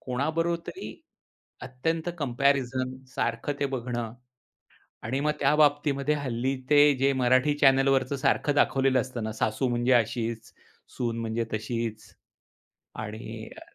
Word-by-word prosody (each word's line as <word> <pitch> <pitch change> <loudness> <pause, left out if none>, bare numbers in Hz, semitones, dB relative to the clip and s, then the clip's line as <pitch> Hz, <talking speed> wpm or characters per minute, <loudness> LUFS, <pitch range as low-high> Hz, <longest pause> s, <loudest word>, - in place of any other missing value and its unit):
कोणाबरोबर 160 +7 -1
तरी 380 - -7 0.7
अत्यंत 160 +7 -2
कम्पॅरिझन 130 -1 0 0.2
सारखं 115 +5 -1
ते 140 - +2
बघणं 120 -3 -4 0.9
आणि 130 +5 -2
मग 150 - +1
त्या 140 +1 +3
बाबतीमध्ये 145 -1 +2
हल्ली 130 -2 -2 0.2
ते 145 - +7 0.2
जे 135 +1 +3
मराठी 130 +3 +3
चॅनेलवरचं 135 -1 +3
सारखं 145 +2 +1
दाखवलेलं 135 -2 +3
असतं 120 -2 -5
ना 110 - -3
सासू 110 +4 -1
म्हणजे 120 +1 +1
अशीचं, 115 -1 0 0.4
सून 115 -2 -2
म्हणजे 115 +1 -2
तशीचं. 110 0 -4 0.9
आणि, 110 +1 -7
अ, - - -10
130 Hz, 120 wpm, -27 LUFS, 115-140 Hz, 0.9 s, ते